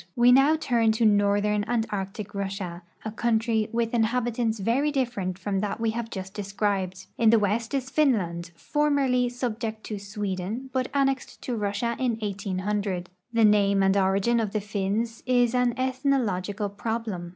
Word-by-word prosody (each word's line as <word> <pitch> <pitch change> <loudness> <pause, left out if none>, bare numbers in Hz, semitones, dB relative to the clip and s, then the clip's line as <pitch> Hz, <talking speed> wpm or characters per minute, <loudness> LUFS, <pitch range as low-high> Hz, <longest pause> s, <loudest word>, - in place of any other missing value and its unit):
We 240 0 +6
now 270 +5 +6
turn 235 -7 +2
to 225 +1 +1
northern 205 0 +3
and 230 -1 0
Arctic 200 +1 -4
Russia, 195 -3 -4 0.2
a 215 - -3
country 225 -1 +1
with 230 0 -1
inhabitants 235 0 +1
very 235 +9 +1
different 235 -10 -2
from 195 0 -2
that 210 +2 -2
we 225 -1 +1
have 230 0 -4
just 190 -3 -6
described. 195 -2 -2
In 230 -2 +5
the 230 - +6
west 220 +4 0
is 265 0 -2
Finland, 185 - +1
formerl}" 275 - +1
subject 230 -3 -4
to 210 -2 -5
Sweden, 205 +4 -4
but 255 -1 0
annexed 270 -1 -1
to 250 - -2
Russia 210 +2 -1
in 245 -4 0
1800. 200 -2 -2 0.2
The 230 -1 +4
name 200 -2 +4
and 195 0 +3
origin 195 +4 +2
of 215 -3 -2
the 215 - +1
Finns 210 +3 -2
is 245 -2 +3
an 250 -1 +2
ethno 260 +2 +1
logical 205 +1 -2
problem. 210 -4 -4
220 Hz, 160 wpm, -26 LUFS, 200-240 Hz, 0.2 s, We